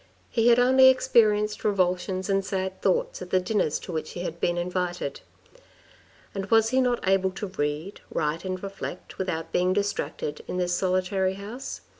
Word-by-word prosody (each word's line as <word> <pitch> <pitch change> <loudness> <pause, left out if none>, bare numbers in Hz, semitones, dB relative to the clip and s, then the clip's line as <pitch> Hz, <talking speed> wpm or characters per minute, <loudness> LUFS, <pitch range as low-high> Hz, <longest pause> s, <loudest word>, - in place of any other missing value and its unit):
He 230 -1 +2
had 240 0 +6
only 260 +1 +6
experienced 215 -5 +3
revulsions 185 -1 0
and 195 0 +1
sad 190 -1 -3
thoughts - - 0
at - - -7
the 185 - +3
dinners 180 -5 0
to - - -7
which 155 -2 -4
he 175 - -5
had 170 -1 -5
been 175 0 0
invited. 175 -3 -2 1.1
And 195 -1 -4
was 225 0 +4
he 260 +1 +3
not 245 -5 0
able 190 0 +3
to 190 +3 -5
read, 155 +1 -3
write 155 0 -1
and 185 0 -4
reflect, 195 -2 -7
without 165 -4 -3
being 180 +1 +2
distracted, 200 -6 -2
in - - -3
this 180 -1 0
solitary 185 +1 0
house? 215 +7 -7
190 Hz, 170 wpm, -26 LUFS, 180-210 Hz, 1.1 s, had